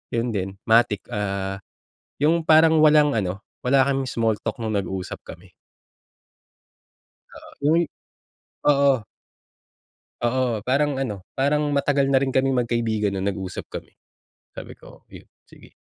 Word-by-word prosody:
'yun 120 +1 -1
din. 95 -2 -3
Matic, 110 -3 +3
ah, 100 -1 -3 0.6
'yung 160 +2 +2
parang 160 +1 +5
walang 150 -3 +5
ano, 100 -1 -2 0.2
wala 135 +2 +4
kaming 135 -1 -1
small 115 -3 0
talk 110 +1 -3
nung 110 -1 -2
nag-usap 95 -1 -4
kami. - - -12 1.8
Oo, - - -13
yung 155 +4 +3 0.9
oo. 140 -1 +5 1.3
Oo, 120 -3 0
parang 140 +4 +1
ano, 105 -8 -4
parang 145 +2 +1
matagal 140 -1 +2
na 135 - +2
rin 135 - -1
kaming 130 0 +1
magkaibigan 115 -3 -1
nung 95 0 -3
nag-usap 95 -2 -5
kami. - - -9 0.6
Sabi - - -10
ko, - - -16
yun - - -13 0.2
sige. - - -18
120 Hz, 130 wpm, -23 LUFS, 105-140 Hz, 1.8 s, parang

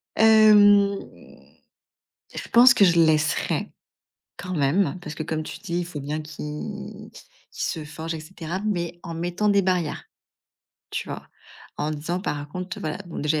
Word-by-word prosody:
Hem, 210 -2 +6 1.4
je - - -6
pense 250 +3 +8
que 210 - +5
je 175 -2 +4
laisserais 155 -1 +1 0.6
quand 185 +1 -5
même, 155 +3 +1
parce 155 -3 -7
que, 155 - -4
comme 155 0 -3
tu - - -8
dis, 175 -4 -3
il 175 - -4
faut 165 -4 -7
bien 150 +3 -3
qui 150 0 -7 0.4
qu'il - - -3
se 160 - -3
forge 160 +2 -6
et 160 - -5
cetera, 170 +2 -6
mais 175 -5 -2
en 170 - -6
mettant 175 +5 -1
des 200 -1 +4
barrières. 180 -4 -1 0.9
Tu - - -4
vois? - - -7 0.5
En 150 +1 -2
disant, 160 +4 -3
par 150 -5 -4
contre, 180 +4 -6
voilà, 155 -1 -3
bon 170 - -7
déjà, 150 +1 +1
il - - 0
170 Hz, 165 wpm, -24 LUFS, 155-190 Hz, 1.4 s, pense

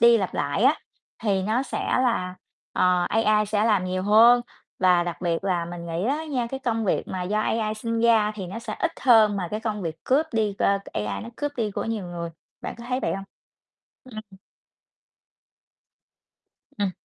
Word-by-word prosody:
đi 235 0 +7
lặp 190 -3 -3
lại 145 +8 -1
á, 285 +4 +6 0.5
thì 195 -3 +1
nó 220 +7 +1
sẽ - - -4 0.2
là, 185 -7 0 0.4
ờ, 180 -1 +3
AI 215 -1 +2
sẽ 210 0 +1
làm 210 -5 +2
nhiều 185 0 -2
hơn. 230 +4 +6 0.4
Và 180 -2 +4
đặc 175 0 -5
biệt 170 0 -1
là 180 -3 0
mình 170 0 -7
nghĩ 170 +3 -2
á 300 +4 -1
nha, 265 -6 -2
cái 265 +3 -6
công 225 -4 -1
việc - - 0
mà 185 -1 -3
do 210 +4 0
AI 215 0 0
sinh 230 +1 -2
ra 220 -2 +4
thì 195 -3 -6
nó 190 +5 -6
sẽ 230 - -5
ít 340 - 0
hơn 220 -5 +5
mà 180 -3 -3
cái 215 - -3
công 210 -3 -3
việc 160 -2 -6
cướp 285 +5 +2
đi, 215 -3 0
ơ, 200 0 +3
AI 105 0 -3
nó 230 - -8
cướp 290 0 -3
đi 220 -3 -1
của - - -3
nhiều 220 -4 -3
người, 170 -1 -5 0.3
bạn - - -5
có 235 - -9
thấy 255 +1 0
vậy - - -1
hông? 195 0 -5 0.8
Ừm. 215 -6 -11 2.4
Ừm. 200 -2 +1
210 Hz, 195 wpm, -25 LUFS, 185-230 Hz, 2.4 s, đi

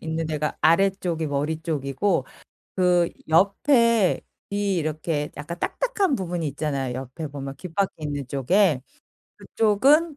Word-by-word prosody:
있는 160 0 -3
데가 150 -1 -2
아래쪽이 170 -1 +2
머리 150 +2 -1
쪽이고 145 +1 0 0.5
그 180 -2 +3 0.2
옆에 220 - +3 0.3
이 200 -1 0
이렇게 155 -1 -2
약간 170 +4 -6
딱딱한 405 - 0
부분이 175 -6 -2
있잖아요 140 -3 -2
옆에 135 +5 -6
보면 140 -1 -7
귓바퀴 185 +2 -1
있는 145 -3 -3
쪽에. 145 +3 +2 0.6
그쪽은 275 +9 +3
165 Hz, 270 characters per minute, -24 LUFS, 145-195 Hz, 0.6 s, 그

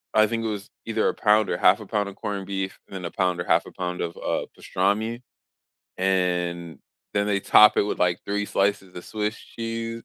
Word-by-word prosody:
I 110 - +6
think 115 +1 -2
it - - +1
was 105 -2 -4 0.2
either 110 -1 +1
a - - +1
pound 105 0 +3
or 85 - 0
1/2 95 +4 +5
a 105 - -9
pound 105 -2 0
of 95 - -11
corned 100 -2 -4
beef 95 -1 -3
and 95 - -10
then 90 - -5
a 85 - -4
pound 90 -2 0
or 85 - -4
1/2 85 +1 +3
a - - -11
pound 90 -1 -4
of, 85 -1 -3
uh, - - -2
pastrami. 110 +5 -1 0.8
And 90 -3 0 0.3
then, 100 0 +1
they 100 -1 +1
top 105 +2 +6
it - - +5
with, 105 - -2
like, 90 0 +1
3 105 0 -1
slices 95 -2 0
of 90 - -9
Swiss 105 0 -2
cheese, 115 0 -5
100 Hz, 220 wpm, -25 LUFS, 90-105 Hz, 0.8 s, I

